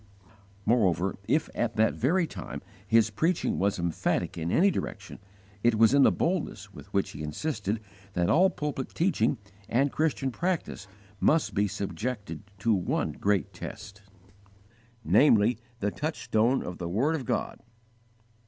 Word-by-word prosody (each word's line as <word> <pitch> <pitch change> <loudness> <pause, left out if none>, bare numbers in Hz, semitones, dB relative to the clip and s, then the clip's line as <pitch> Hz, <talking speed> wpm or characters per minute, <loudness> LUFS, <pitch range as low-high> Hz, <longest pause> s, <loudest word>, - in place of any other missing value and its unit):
Moreover, 95 -5 +2
if, 155 +1 +2
at 115 -2 -1
that 110 0 +3
very 170 +8 +2
time, - - -7 0.2
his 110 0 +4
preaching 165 - 0
was 100 +1 +1
emphatic 85 -2 -1
in 85 +1 -3
any 195 +4 +4
direction, 100 - -5 0.4
it 120 0 +3
was 115 +3 +5
in 140 - +6
the - - +6
boldness 180 -1 -2
with - - -12
which - - 0
he 75 - -8
insisted 105 - -2 0.3
that 90 -2 +1
all 185 - +5
pulpit 145 -5 -4
teaching 170 -5 +1 0.3
and 135 +4 +2
Christian 145 -4 0
practice 170 - -2 0.3
must 160 0 +2
be 105 +1 +2
subjected 105 +3 -4 0.2
to 110 +3 +2
one 95 -4 0
great 100 -1 0
test, 100 +1 -9 1.0
namely, 115 -3 +4 0.2
_the 100 0 -1
touchstone 120 -4 0
of 90 - -7
the 85 -1 -3
word 125 - +1
of 155 -5 -2
God. 120 -4 -2
115 Hz, 145 wpm, -28 LUFS, 100-150 Hz, 1.0 s, in